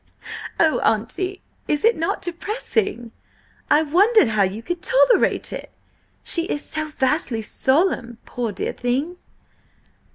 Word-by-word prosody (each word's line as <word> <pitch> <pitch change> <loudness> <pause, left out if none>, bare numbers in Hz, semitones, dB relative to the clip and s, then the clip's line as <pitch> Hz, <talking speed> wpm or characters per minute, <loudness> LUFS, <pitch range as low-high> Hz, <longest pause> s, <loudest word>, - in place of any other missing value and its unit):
"Oh, 320 -2 +3
Auntie, 255 - -1 0.2
is 295 - 0
it 460 0 +5
not 330 +1 -2
depressing? 390 - -2 0.6
I 305 - +5
wondered 380 - +4
how 215 -2 +1
you 200 +4 -1
could 350 +3 -4
tolerate - - +3
it! - - -7 0.5
She 335 -1 +1
is 295 - -3
so 310 0 -3
vastly 265 -5 -1
solemn, 260 - 0
poor 240 -3 -3
dear 190 - -3
thing!" 270 +9 -2
310 Hz, 125 wpm, -22 LUFS, 240-370 Hz, 0.6 s, it